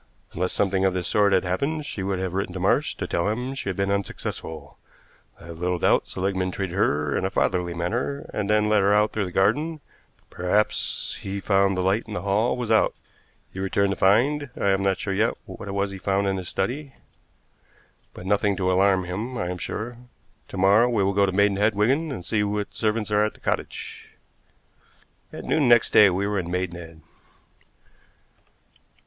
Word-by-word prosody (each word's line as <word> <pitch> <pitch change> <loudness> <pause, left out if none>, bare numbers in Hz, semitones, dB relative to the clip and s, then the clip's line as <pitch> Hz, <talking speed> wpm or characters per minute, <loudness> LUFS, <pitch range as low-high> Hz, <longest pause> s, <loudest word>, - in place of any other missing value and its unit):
Unless 90 +2 -1
something 95 -1 +1
of 95 -1 +2
this 90 -2 -2
sort 105 -1 +3
had 95 -1 +3
happened 140 - -2
she 100 - -5
would 95 0 -1
have 95 -1 -3
written 95 -1 -2
to 95 - -5
Marsh 95 - +1
to - - -4
tell 85 +4 0
him 125 +5 -3
she 135 -7 -4
had 95 - -2
been 100 +1 0
unsuccessful. 80 -6 -5 0.6
I - - -14
have 85 -1 -9
little 90 0 0
doubt - - +2
Seligmann 95 0 -1
treated 95 -1 -4
her 75 -7 +1
in - - -1
a 95 - 0
fatherly 90 -2 0
manner, 120 +11 -2
and 105 -1 -2
then 105 0 +3
let 105 -1 +3
her 100 +1 +3
out 105 +1 +2
through 105 -2 -1
the 90 - -6
garden, 145 - +1 0.5
perhaps 95 +4 0
because - - -10
he 100 +1 -4
found 100 -1 +2
the 90 - 0
light 95 +5 +1
in 105 - -6
the - - -4
hall 105 +5 +1
was 120 -3 -3
out. 110 - +3 0.6
He 95 - -7
returned 95 +1 +1
to - - -1
find 130 +10 +2
I 100 - +2
am 95 0 +2
not 95 -1 +1
sure 100 - -3
yet 110 +4 +1
what 95 +2 -9
it 100 - -4
was 100 0 -1
he 95 - -8
found 100 +1 0
in 95 -1 0
his 90 -2 -5
study, 135 +8 -3 1.2
but 90 - -9
nothing 100 0 +1
to 95 0 0
alarm 95 0 +3
him, 105 +8 -4
I 90 - -2
am 90 - -5
sure. 115 +6 -5 0.5
To - - -8
morrow 100 +6 +5
we 110 -5 +1
will 100 +1 +1
go 100 0 +3
to - - 0
Maidenhead, 100 +2 +2
Wigan, 135 +10 +1
and 90 -10 -6
see 110 -2 0
what 105 0 -2
servants 110 -1 -1
are 105 0 +3
at 105 - -2
the - - -19
cottage." - - -4 1.2
At - - -8
noon 150 -4 +2
next 120 -1 +5
day 105 - +8
we 95 +2 -1
were 100 -1 0
in 85 -1 -4
Maidenhead. 85 -3 -5
100 Hz, 205 wpm, -24 LUFS, 95-105 Hz, 1.2 s, day